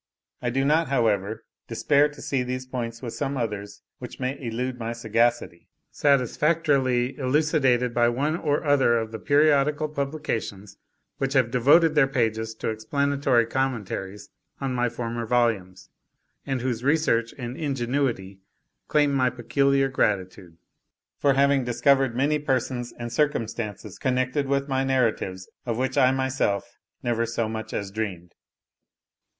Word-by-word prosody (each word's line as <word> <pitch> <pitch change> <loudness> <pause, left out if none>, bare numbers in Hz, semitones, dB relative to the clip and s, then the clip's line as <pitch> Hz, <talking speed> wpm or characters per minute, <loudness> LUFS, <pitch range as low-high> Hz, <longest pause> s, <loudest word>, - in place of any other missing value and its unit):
I 120 - -1
do 135 +3 0
not, 155 +3 +3
however, 110 -4 0 0.2
despair 145 +5 +2
to 145 - -12
see 135 -2 0
these 130 +1 -4
points, 120 -2 -5
with 115 - -5
some 140 -1 -3
others 105 -4 -4 0.2
which 125 - -9
may 130 +1 -2
elude 125 +2 -3
my 115 0 -3
sagacity, 115 -5 0 0.2
satisfactorily 135 -2 +2
elucidated 130 -3 +2
by 120 0 +3
one 140 +6 0
or 150 -4 -1
other 135 -5 +3
of 110 -1 -3
the 110 - -6
periodical 150 +1 +3
publications 140 -9 -4 0.4
which 135 0 -1
have 130 -4 +2
devoted 150 +7 +5
their 150 -3 +4
pages 110 -3 -1
to - - -3
explanatory 135 +2 +1
commentaries 115 -6 -3 0.3
on 135 -2 -2
my 125 -1 +1
former 115 0 -4
volumes; 110 -7 0 0.6
and 135 -2 -1
whose 120 -2 -2
research 135 -6 +2
and 120 -1 -5
ingenuity 125 -8 -2 0.5
claim 145 -2 +2
my 130 -2 +3
peculiar 135 +3 +1
gratitude, 95 -8 -2 0.6
for 140 - +3
having 140 -1 +3
discovered 125 +1 +2
many 145 +4 +1
persons 125 -3 -1
and 120 0 -6
circumstances 110 -8 -2
connected 130 +2 0
with 140 0 0
my 135 -1 0
narratives, 115 -8 0 0.2
of 115 -1 -1
which 130 +1 -1
I 130 - +5
myself 130 -6 -1 0.2
never 115 -1 0
so 115 0 -1
much 110 0 -5
as 100 -1 -4
dreamed. 95 -5 -5
125 Hz, 140 wpm, -25 LUFS, 115-140 Hz, 0.6 s, devoted